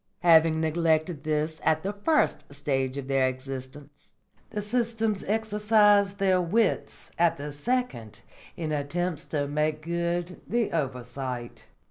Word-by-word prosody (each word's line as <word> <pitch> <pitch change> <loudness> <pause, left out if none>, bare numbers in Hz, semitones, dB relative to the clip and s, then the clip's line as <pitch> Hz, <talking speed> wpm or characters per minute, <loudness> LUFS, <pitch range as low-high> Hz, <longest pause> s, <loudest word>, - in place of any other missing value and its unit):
Having 165 -2 +5
neglected 160 -1 +1
this 155 +1 -1
at 155 0 +2
the 200 +2 -2
first 205 - +1
stage 135 -2 -2
of 135 -2 -5
their 135 -1 +2
existence, 135 +2 -8 0.4
the 210 - -4
systems 225 -1 0
exercise 210 -1 +3
their 190 -2 +2
wits 205 +6 0
at 170 -1 +3
the 145 +1 -6
second 145 - -2 0.4
in 160 -2 -3
attempts 155 +2 -2
to 145 -2 -2
make 150 +1 -1
good 170 +1 -2
the 235 -2 0
oversight." 125 -4 -4
160 Hz, 125 wpm, -27 LUFS, 140-200 Hz, 0.4 s, Having